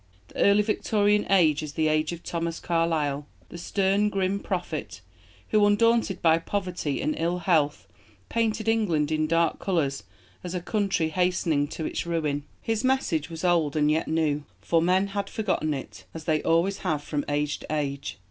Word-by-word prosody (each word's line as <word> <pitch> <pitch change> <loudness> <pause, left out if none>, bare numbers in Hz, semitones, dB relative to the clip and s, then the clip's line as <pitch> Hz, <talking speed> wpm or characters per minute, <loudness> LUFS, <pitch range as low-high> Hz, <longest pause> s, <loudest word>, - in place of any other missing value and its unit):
The - - -12
early 200 +1 +5
Victorian 210 -1 +1
age 160 -6 +4
is 150 -1 -6
the 160 -1 +1
age 155 +1 +1
of 170 0 -7
Thomas 165 -1 -3
Carlyle, 155 -4 0 0.2
the - - -9
stern, 195 +3 +1
grim 195 0 0
prophet, - - -4 0.5
who, 215 -1 +3
undaunted 210 -1 +2
by 165 -1 +5
poverty 180 -5 -3
and 305 +2 +1
ill 170 +2 0
health, 160 -5 +1 0.4
painted 220 -1 -1
England 175 -10 +1
in 155 0 +1
dark 165 0 +1
colours 150 - 0 0.4
as 180 0 -5
a - - 0
country 195 -4 0
hastening 170 -4 +1
to 160 +1 -5
its - - -3
ruin. 150 -4 -1 0.2
His 225 -1 -1
message 225 - +1
was 165 0 -7
old 165 -5 +2
and 150 -1 +3
yet 160 +2 0
new 155 -2 0 0.2
for 165 -1 +1
men 185 +3 +3
had 200 0 -3
forgotten 190 -8 -1
it, 135 -3 -6
as 160 - -6
they 155 -2 +1
always 170 +4 +1
have 150 -2 -1
from 145 -1 -2
age 145 0 -1
to - - -11
age. 140 -4 -3
170 Hz, 175 wpm, -26 LUFS, 155-200 Hz, 0.5 s, early